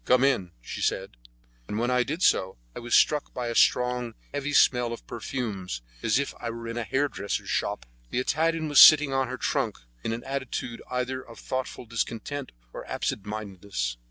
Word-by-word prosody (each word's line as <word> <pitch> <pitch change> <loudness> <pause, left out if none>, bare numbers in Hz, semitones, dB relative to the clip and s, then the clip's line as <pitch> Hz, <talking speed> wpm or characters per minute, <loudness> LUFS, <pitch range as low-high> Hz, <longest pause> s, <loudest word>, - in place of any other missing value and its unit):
"Come 125 +1 +4
in," 125 -10 +2
she - - -6
said, - - 0 0.6
and 105 - -3
when 120 +2 +1
I 125 0 +3
did 155 +8 -2
so 95 -5 +3 0.2
I - - -5
was 120 0 0
struck 150 -1 +3
by 125 -2 -2
a - - -2
strong, 125 -1 +2 0.2
heavy 145 0 -2
smell 125 -4 +4
of 115 - -9
perfumes, 100 - -4 0.2
as 110 - +2
if 140 - -1
I 120 - -4
were 115 0 -6
in 115 - -4
a 120 - -1
hairdresser's 125 -6 -1
shop. - - -1 0.2
The - - -3
Italian 160 +5 +1
was 145 -2 +5
sitting 150 -3 +9
on 135 -1 +1
her 130 +1 -5
trunk - - -1 0.3
in - - -1
an 115 +1 -4
attitude 130 -3 -4
either 125 +1 -2
of 115 -2 -13
thoughtful 130 -1 -4
discontent 120 +4 -3 0.2
or - - -6
absent 105 - -3
mindedness. 100 - -4
125 Hz, 185 wpm, -27 LUFS, 115-135 Hz, 0.6 s, sitting